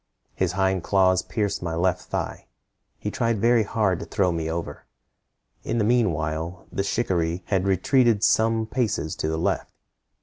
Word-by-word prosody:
His 95 Hz, -2 st, -1 dB
hind 95 Hz, -1 st, +1 dB
claws 95 Hz, 0 st, +3 dB
pierced 100 Hz, -2 st, -2 dB
my 85 Hz, -2 st, -3 dB
left 90 Hz, +1 st, 0 dB
thigh. -, -, -4 dB, 0.5 s
He 105 Hz, -, -4 dB
tried 115 Hz, -2 st, 0 dB
very 115 Hz, +2 st, +4 dB
hard 100 Hz, -3 st, 0 dB
to -, -, -6 dB
throw 95 Hz, -4 st, +1 dB
me 80 Hz, -1 st, -2 dB
over. 80 Hz, -3 st, -5 dB, 0.8 s
In -, -, -2 dB
the 110 Hz, -, +2 dB
mean 115 Hz, -2 st, +3 dB
while 80 Hz, +4 st, -4 dB
the -, -, -1 dB
shikaree 90 Hz, -4 st, -1 dB
had 95 Hz, -1 st, +1 dB
retreated 115 Hz, +2 st, +3 dB
some 115 Hz, -1 st, +3 dB
paces 110 Hz, -9 st, -1 dB
to -, -, -2 dB
the 80 Hz, -, -1 dB
left. 80 Hz, -, -1 dB
95 Hz, 165 wpm, -24 LUFS, 85-110 Hz, 0.8 s, very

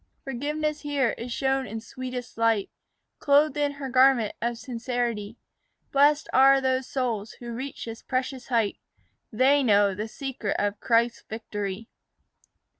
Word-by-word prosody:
Forgiveness 295 Hz, +3 st, -2 dB
here 285 Hz, -5 st, +1 dB
is 240 Hz, +1 st, -7 dB
shown 270 Hz, +1 st, 0 dB
in 220 Hz, +2 st, -5 dB
sweetest 250 Hz, +1 st, -7 dB
light, 225 Hz, -3 st, +1 dB, 0.5 s
Clothed 290 Hz, +2 st, +4 dB
in 290 Hz, -1 st, 0 dB
her 280 Hz, -1 st, -6 dB
garment 255 Hz, -3 st, +4 dB
of 235 Hz, 0 st, -1 dB
sincerity. 235 Hz, -3 st, -3 dB, 0.5 s
Blest 290 Hz, +2 st, +4 dB
are 270 Hz, +1 st, +7 dB
those 260 Hz, -1 st, 0 dB
souls 230 Hz, -5 st, -2 dB
who 235 Hz, -1 st, -8 dB
reach 265 Hz, +4 st, -6 dB
this 225 Hz, -1 st, -7 dB
precious 255 Hz, 0 st, -3 dB
height; 230 Hz, -5 st, 0 dB, 0.5 s
They 265 Hz, +5 st, +4 dB
know 205 Hz, -5 st, +4 dB
the 210 Hz, +3 st, -4 dB
secret 255 Hz, -4 st, -4 dB
of 205 Hz, 0 st, -1 dB
Christ's 235 Hz, 0 st, +2 dB
victory. 210 Hz, -1 st, -5 dB
250 Hz, 135 wpm, -26 LUFS, 225-270 Hz, 0.5 s, are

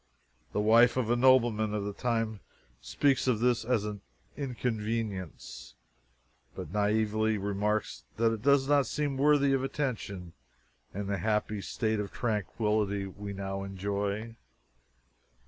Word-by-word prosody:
The -, -, -1 dB
wife 115 Hz, +4 st, +5 dB
of 120 Hz, -3 st, 0 dB
a -, -, +4 dB
nobleman 120 Hz, -4 st, +3 dB
of 105 Hz, -, -2 dB
the 105 Hz, -, -3 dB
time 115 Hz, -2 st, -1 dB, 0.4 s
speaks 135 Hz, -, +1 dB
of 120 Hz, -4 st, +2 dB
this 120 Hz, 0 st, +2 dB
as 115 Hz, -3 st, 0 dB
an 105 Hz, -2 st, -5 dB, 0.3 s
"inconvenience," 110 Hz, -, -4 dB, 0.8 s
but 75 Hz, -, -7 dB
naively 110 Hz, +1 st, +1 dB
remarks 105 Hz, +2 st, -1 dB
that 115 Hz, 0 st, +3 dB
"it 110 Hz, -, -5 dB
does 140 Hz, +1 st, +4 dB
not 145 Hz, -2 st, +3 dB
seem 145 Hz, -2 st, -1 dB
worthy 140 Hz, 0 st, +4 dB
of 135 Hz, -1 st, +1 dB
attention 110 Hz, -, -4 dB, 0.6 s
in 100 Hz, +1 st, -4 dB
the 100 Hz, -1 st, -2 dB
happy 105 Hz, +1 st, -1 dB
state 110 Hz, +1 st, -1 dB
of 100 Hz, -2 st, -4 dB
tranquillity 105 Hz, -2 st, -1 dB
we 100 Hz, +1 st, -7 dB
now 95 Hz, 0 st, -4 dB
enjoy." 100 Hz, +3 st, -3 dB
110 Hz, 130 wpm, -30 LUFS, 100-120 Hz, 0.8 s, wife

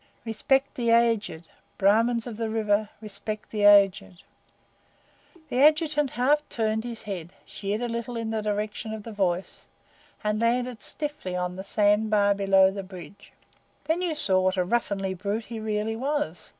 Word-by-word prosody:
"Respect 265 Hz, +5 st, +1 dB
the 235 Hz, -2 st, -1 dB
aged! 225 Hz, -8 st, +2 dB, 0.3 s
Brahmins 225 Hz, +4 st, +3 dB
of 235 Hz, -4 st, -7 dB
the 225 Hz, -1 st, -2 dB
River 215 Hz, -1 st, +1 dB
respect 215 Hz, 0 st, -6 dB
the 210 Hz, -2 st, 0 dB
aged!" 195 Hz, -2 st, +4 dB, 1.3 s
The 250 Hz, -, +1 dB
Adjutant 300 Hz, -1 st, +4 dB
half 285 Hz, +5 st, +3 dB
turned 220 Hz, -1 st, -1 dB
his 235 Hz, -2 st, -6 dB
head, 185 Hz, -5 st, -6 dB
sheered 205 Hz, +2 st, -4 dB
a 245 Hz, -, -1 dB
little 235 Hz, +1 st, -4 dB
in 225 Hz, -1 st, -3 dB
the 220 Hz, -1 st, -1 dB
direction 210 Hz, +1 st, -3 dB
of 215 Hz, -, -9 dB
the 230 Hz, -, -8 dB
voice, 190 Hz, -3 st, -2 dB, 0.6 s
and 210 Hz, +1 st, 0 dB
landed 245 Hz, 0 st, 0 dB
stiffly 295 Hz, -12 st, -5 dB
on 180 Hz, 0 st, -2 dB
the 190 Hz, -, -6 dB
sand 210 Hz, +2 st, +2 dB
bar 205 Hz, -1 st, +3 dB
below 195 Hz, -1 st, +4 dB
the 195 Hz, 0 st, -5 dB
bridge. 185 Hz, -1 st, -12 dB, 0.5 s
Then 325 Hz, +3 st, 0 dB
you 345 Hz, -4 st, -1 dB
saw 190 Hz, -10 st, +2 dB
what 185 Hz, +1 st, +1 dB
a 180 Hz, -, +1 dB
ruffianly 195 Hz, -3 st, -1 dB
brute 205 Hz, +4 st, -3 dB
he 230 Hz, -2 st, -6 dB
really 215 Hz, 0 st, -2 dB
was. 260 Hz, -, -3 dB
215 Hz, 165 wpm, -26 LUFS, 195-235 Hz, 1.3 s, aged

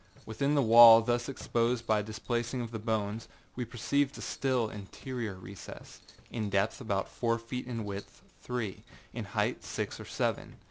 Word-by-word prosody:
Within 140 Hz, +6 st, 0 dB
the 140 Hz, -, +4 dB
wall 115 Hz, 0 st, +10 dB
thus 120 Hz, +2 st, 0 dB
exposed 120 Hz, -2 st, 0 dB
by 110 Hz, -2 st, +2 dB
the 105 Hz, -, -9 dB
displacing 120 Hz, +3 st, -2 dB
of 115 Hz, -1 st, -5 dB
the 110 Hz, -, -4 dB
bones, 110 Hz, 0 st, -2 dB, 0.3 s
we 125 Hz, -, -3 dB
perceived 135 Hz, +4 st, 0 dB
a -, -, -8 dB
still 130 Hz, -4 st, 0 dB
interior 110 Hz, +1 st, -6 dB
recess, 95 Hz, 0 st, -11 dB, 0.3 s
in 110 Hz, -3 st, -2 dB
depth 100 Hz, +4 st, 0 dB
about 100 Hz, -5 st, -1 dB
four 115 Hz, -1 st, 0 dB
feet, 120 Hz, +2 st, -6 dB
in 115 Hz, -3 st, -4 dB
width 100 Hz, 0 st, -7 dB, 0.2 s
three, 120 Hz, -6 st, -4 dB, 0.3 s
in -, -, -4 dB
height -, -, -1 dB
six -, -, -4 dB
or -, -, -8 dB
seven. -, -, -2 dB
115 Hz, 170 wpm, -31 LUFS, 105-125 Hz, 0.3 s, wall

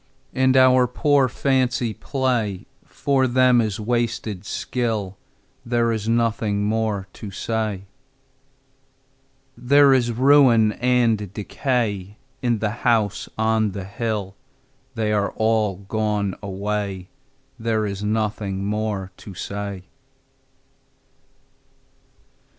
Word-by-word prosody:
And 130 Hz, 0 st, +3 dB
our 130 Hz, -1 st, +5 dB
poor 140 Hz, +2 st, +2 dB
fancy 130 Hz, -3 st, 0 dB
play 120 Hz, -8 st, -2 dB, 0.2 s
For 135 Hz, -2 st, +1 dB
them 125 Hz, -1 st, +4 dB
is 110 Hz, -3 st, -2 dB
wasted 115 Hz, -3 st, -2 dB
skill: 110 Hz, -6 st, -2 dB, 0.5 s
There 120 Hz, -1 st, +1 dB
is 110 Hz, -1 st, -2 dB
nothing 115 Hz, -3 st, +1 dB
more 105 Hz, -3 st, -1 dB
to 105 Hz, -, -8 dB
say. 105 Hz, -1 st, -3 dB, 1.7 s
There 140 Hz, +3 st, +5 dB
is 120 Hz, -2 st, +2 dB
ruin 125 Hz, -3 st, +5 dB
and 115 Hz, -4 st, +1 dB
decay 105 Hz, -2 st, -2 dB, 0.2 s
In 120 Hz, -2 st, +1 dB
the 105 Hz, 0 st, -1 dB
House 110 Hz, -4 st, +1 dB
on 110 Hz, -2 st, +1 dB
the 95 Hz, -1 st, -5 dB
Hill 100 Hz, -1 st, -3 dB, 0.6 s
They 110 Hz, -1 st, 0 dB
are 100 Hz, -1 st, +1 dB
all 110 Hz, -3 st, +1 dB
gone 105 Hz, -2 st, -1 dB
away, 100 Hz, -1 st, -4 dB, 0.5 s
There 110 Hz, -1 st, 0 dB
is 100 Hz, 0 st, -4 dB
nothing 105 Hz, -2 st, -2 dB
more 105 Hz, -2 st, -2 dB
to 100 Hz, -, -11 dB
say. 100 Hz, 0 st, -5 dB
110 Hz, 100 wpm, -22 LUFS, 100-120 Hz, 1.7 s, our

